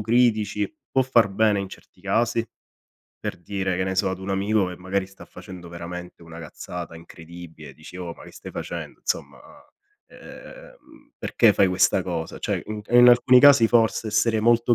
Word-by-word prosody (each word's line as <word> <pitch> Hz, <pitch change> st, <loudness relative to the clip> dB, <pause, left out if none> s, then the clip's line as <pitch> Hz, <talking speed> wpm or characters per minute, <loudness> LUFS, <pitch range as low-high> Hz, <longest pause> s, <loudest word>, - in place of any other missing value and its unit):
critici 110 Hz, -2 st, +1 dB, 0.2 s
può 135 Hz, -, +2 dB
far 120 Hz, -5 st, +3 dB
bene 105 Hz, +1 st, +2 dB
in 95 Hz, -, -5 dB
certi 95 Hz, -, -16 dB
casi, 115 Hz, +4 st, 0 dB, 0.7 s
per -, -, -4 dB
dire, 95 Hz, +1 st, -3 dB
che 95 Hz, -, -1 dB
ne 95 Hz, 0 st, -2 dB
so, 95 Hz, 0 st, +1 dB
ad 95 Hz, -, -5 dB
un 95 Hz, +1 st, -6 dB
amico 100 Hz, +1 st, +1 dB
che 90 Hz, 0 st, -7 dB
magari 95 Hz, +2 st, -3 dB
sta 95 Hz, 0 st, -15 dB
facendo 90 Hz, -3 st, -11 dB
veramente 85 Hz, +1 st, -9 dB
una 80 Hz, 0 st, -11 dB
cazzata 85 Hz, +1 st, -8 dB
incredibile, 80 Hz, -3 st, -12 dB
dici: 80 Hz, +3 st, -13 dB
"Oh 90 Hz, -2 st, -6 dB
ma -, -, -14 dB
che -, -, -14 dB
stai -, -, -10 dB
facendo? -, -, -7 dB
Insomma, -, -, -3 dB, 0.7 s
ehm, 315 Hz, -13 st, -15 dB
perché 115 Hz, -3 st, +3 dB
fai 100 Hz, -1 st, +3 dB
questa 95 Hz, +1 st, +2 dB
cosa?" 85 Hz, -3 st, -5 dB
Cioè -, -, -2 dB
in 105 Hz, 0 st, -5 dB
e 120 Hz, +2 st, +3 dB
in 120 Hz, -, +8 dB
alcuni 125 Hz, +1 st, +6 dB
casi 130 Hz, -5 st, +7 dB
forse 115 Hz, -1 st, +2 dB
essere 110 Hz, +1 st, +1 dB
molto 120 Hz, +1 st, +3 dB
100 Hz, 180 wpm, -23 LUFS, 90-115 Hz, 0.7 s, in